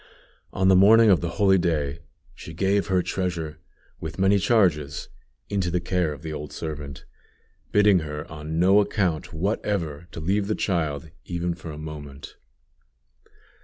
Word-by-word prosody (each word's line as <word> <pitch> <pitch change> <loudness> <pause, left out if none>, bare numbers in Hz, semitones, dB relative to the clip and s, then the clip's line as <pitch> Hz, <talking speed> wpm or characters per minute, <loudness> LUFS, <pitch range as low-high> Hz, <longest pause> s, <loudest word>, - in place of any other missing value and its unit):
On 95 - +1
the 95 - +6
morning 110 +3 +7
of 90 - +4
the 85 - -2
holy 95 -2 +4
day, 80 -3 -1 0.3
she 80 - -10
gave 100 +3 +1
her 95 -2 +2
treasure, 85 -5 -3 0.4
with - - -6
many 95 +1 +3
charges, 85 -10 +1 0.4
into 95 -3 -1
the 90 +1 0
care 90 -2 0
of 75 +1 -9
the 80 -1 -5
old 75 -1 -6
servant, 75 -4 -6 0.7
bidding 105 -2 +5
her 75 -1 -6
on 75 +1 -6
no 95 +4 +5
account 95 -6 0
whatever 85 -3 -2
to - - -7
leave 100 +5 0
the 110 - 0
child, 80 -4 -2
even 85 0 -2
for 85 -1 -9
a 75 - -7
moment. 75 -2 -9
85 Hz, 155 wpm, -25 LUFS, 75-95 Hz, 0.7 s, morning